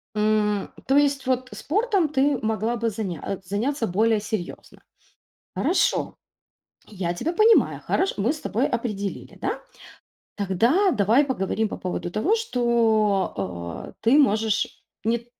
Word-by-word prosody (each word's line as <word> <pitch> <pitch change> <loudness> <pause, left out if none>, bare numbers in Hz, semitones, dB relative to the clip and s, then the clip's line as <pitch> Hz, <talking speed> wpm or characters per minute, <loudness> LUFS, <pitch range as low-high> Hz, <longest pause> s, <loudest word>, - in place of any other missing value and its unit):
М. 210 -1 +1 0.2
То 270 +1 +4
есть, 280 -1 +2
вот 255 0 0
спортом 380 - 0
ты 280 -1 +2
могла 220 +2 0
бы 230 0 0
заня 195 -3 -4
заняться 225 +7 -1
более 220 +4 +2
серьёзно. 205 -3 -6 0.8
Хорошо, - - +1 0.7
я 185 -5 -3
тебя 310 - -2
понимаю, 435 +5 +4
хорош 385 - 0
мы 210 +5 +1
с 310 - -8
тобой 240 +6 0
определили, 210 -5 -4
да? - - -2 0.7
Тогда 230 - +2
давай 225 - +3
поговорим 220 -4 -1
по - - -6
поводу 180 -1 -4
того, 310 - +1
что, 230 - +1
а, 85 -3 -5
ты 235 +7 +5
можешь, 220 -5 +1 0.2
нет, 235 +1 0
225 Hz, 130 wpm, -24 LUFS, 200-275 Hz, 0.8 s, ты